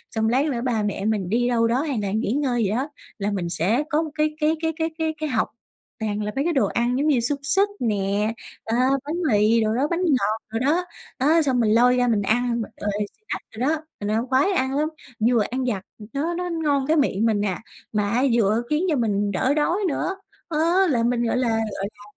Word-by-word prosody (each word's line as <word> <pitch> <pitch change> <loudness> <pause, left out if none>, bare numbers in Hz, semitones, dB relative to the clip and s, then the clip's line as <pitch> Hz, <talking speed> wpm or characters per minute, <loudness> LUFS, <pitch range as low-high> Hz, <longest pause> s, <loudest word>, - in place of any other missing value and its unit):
xong 220 0 +1
lát 260 +5 +2
nữa 260 -6 -1
ba 230 -4 0
mẹ 200 -1 -2
mình 210 -4 0
đi 240 +4 +2
đâu 230 -2 +2
đó 245 +3 +1
hay 285 -6 -2
là 200 -1 -2
nghỉ 215 0 0
ngơi 255 -3 +1
gì 200 - +1
đó, 255 +8 -1 0.3
là 205 0 -1
mình 180 -4 -2
sẽ 195 - +1
có 305 0 +2
một 315 -2 -4
cái 305 0 0
cái 310 +1 +2
cái 320 0 0
cái 320 0 -1
cái 320 -1 0
cái 310 0 -3
hộc 225 -5 +1 0.5
toàn 210 -1 -2
là 210 - -2
mấy 275 - +1
cái 340 +1 0
đồ 270 - +3
ăn 240 +1 0
giống 290 +3 +1
như 285 -5 +4
xúc 280 +5 -1
xích 390 +8 +2
nè, 210 -1 0 0.3
ờ, 225 - -2 0.3
bánh 305 +3 -3 0.2
mì 215 +2 +4
đồ 215 0 +1
đó, 270 +4 +1
bánh 340 - 0
ngọt 235 - +2
đồ 225 +1 -2
đó. 315 +8 +1 0.3
Đó 310 +5 +4
xong 265 -5 +1
mình 220 -3 +3
lôi 250 +2 +5
ra 250 0 +2
mình 220 -4 +2
ăn 235 +3 +1
b - - -2 0.2
rồi 205 - 0 0.4
snack - - -3
đồ 255 +4 0
đó, 315 0 0 0.2
mình 205 - -3
ăn 225 +3 0
khoái 265 +9 +3
ăn 270 -7 0
lắm. 305 +1 +1 0.3
Vừa 230 +1 +3
ăn 260 +1 -1
vặt 205 -6 -1 0.3
nó 315 +5 -1
nó 360 +1 -3
ngon 295 -5 0
cái 320 +1 +3
miệng 225 -7 +2
mình 215 -3 +2
nà, 195 -3 -1 0.3
mà 210 -2 0
á 240 +5 +1
vừa 220 -1 +3
khiến 300 +3 +1
cho 310 - +2
mình 205 -5 0
đỡ 255 +8 +1
đói 305 +4 +1
nữa, 355 +4 -1 0.3
á, 315 - -2 0.3
là 240 -5 +2
mình, 240 0 +1
gọi 235 - 0
là 250 -2 +1
gọi 220 -3 -1
là, 205 - -17
245 Hz, 245 wpm, -23 LUFS, 215-295 Hz, 0.5 s, lôi